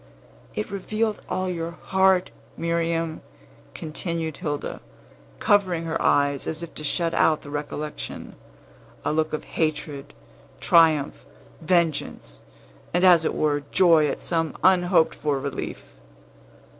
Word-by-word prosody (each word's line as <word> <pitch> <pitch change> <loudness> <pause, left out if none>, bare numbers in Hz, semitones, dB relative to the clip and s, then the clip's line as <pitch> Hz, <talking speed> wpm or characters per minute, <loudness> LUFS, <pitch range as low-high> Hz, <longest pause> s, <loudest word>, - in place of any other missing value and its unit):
"It 215 -1 -3
revealed 215 +2 -2
all 185 +1 -1
your 170 -1 -4
heart, 190 -1 +2 0.3
Miriam," 165 -1 -1 0.5
continued 160 0 -4
Hilda, 150 -5 -4 0.6
covering 185 -5 +2
her 165 0 -2
eyes 140 -1 +2
as 160 +1 -4
if 170 - -8
to 150 - -7
shut 165 +2 0
out 155 -1 +2
the 145 - -10
recollection; 150 +1 -5 0.7
"a - - +1
look 155 0 0
of 155 - -3
hatred, 150 -3 -3 0.4
triumph, 160 -4 +3 0.4
vengeance, 160 - -1 0.5
and, 175 - +2
as 175 -3 +6
it - - 0
were, 145 -1 +1
joy 165 -5 +5
at 140 - -3
some 165 -2 -1
unhoped 180 -3 +4
for 145 -3 -1
relief." 140 +1 -6
165 Hz, 120 wpm, -24 LUFS, 150-180 Hz, 0.7 s, as